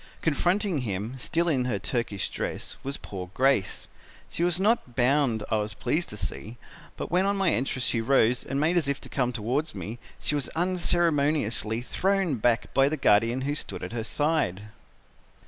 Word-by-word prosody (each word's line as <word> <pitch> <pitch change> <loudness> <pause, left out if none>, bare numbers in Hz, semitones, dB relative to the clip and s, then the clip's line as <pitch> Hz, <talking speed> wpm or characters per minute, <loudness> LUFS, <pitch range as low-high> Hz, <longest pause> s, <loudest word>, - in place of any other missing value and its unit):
Confronting 175 +3 +1
him, 105 -1 -3
still 170 +6 0
in 135 -6 +1
her 120 -5 0
Turkish 105 -1 -2
dress, - - -4
was 140 +1 -4
poor 90 -2 -7
Grace. 130 -7 +1 0.5
She 170 - -1
was 175 0 +2
not 200 - +1
bound 125 -3 +2
I 110 - +3
was 105 0 -3
pleased 170 +3 -1
to 105 - -7
see, 110 +3 -5 0.4
but - - -5
when 185 +3 +3
on 200 0 +1
my 195 -3 +3
entrance 130 0 -1
she 115 - +1
rose 125 0 +3
and 135 +1 -2
made 165 +4 +2
as 160 -5 +1
if 140 -1 -1
to - - -10
come 125 -3 0
towards 125 +7 -2
me, 115 +4 -6 0.2
she - - -1
was 145 -3 0
unceremoniously 155 - +1
thrown 190 +1 0
back 115 +1 +1
by 135 +1 +4
the 155 - -2
guardian 115 0 +3
who 140 +2 -1
stood 150 - -5
at - - -5
her 115 -2 -2
side. 115 - 0
135 Hz, 180 wpm, -27 LUFS, 115-165 Hz, 0.5 s, by